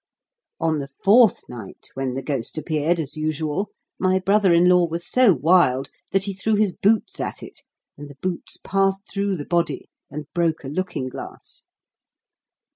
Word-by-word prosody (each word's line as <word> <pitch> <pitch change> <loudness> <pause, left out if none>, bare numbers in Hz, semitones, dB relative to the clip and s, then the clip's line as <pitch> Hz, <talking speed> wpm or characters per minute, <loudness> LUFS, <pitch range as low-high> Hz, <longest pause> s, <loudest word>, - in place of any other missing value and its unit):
On 160 -2 +1
the 140 - -5
fourth 205 - +4
night, 115 -6 -9
when 135 -1 -3
the 135 +1 -4
ghost 135 0 -4
appeared, 155 +2 0
as 150 -1 -4
usual, 155 +5 -2 0.3
my 185 0 +2
brother 195 0 +3
in 170 +1 +5
law 180 -1 +5
was 170 +1 -4
so 255 -4 +5
wild 145 -4 +3 0.2
that 195 0 +1
he 200 0 -3
threw 210 +3 0
his 210 -2 +2
boots 220 - +1
at - - -4
it; - - -12 0.4
and 145 0 -9
the 140 - -13
boots 185 -2 -4
passed 195 0 +1
through 200 -1 -1
the 145 -4 -6
body, 170 -5 -1 0.2
and 150 +1 -6
broke 165 -3 0
a 135 - -6
looking 180 -4 -3
glass. 130 - -10
170 Hz, 170 wpm, -23 LUFS, 145-195 Hz, 0.4 s, in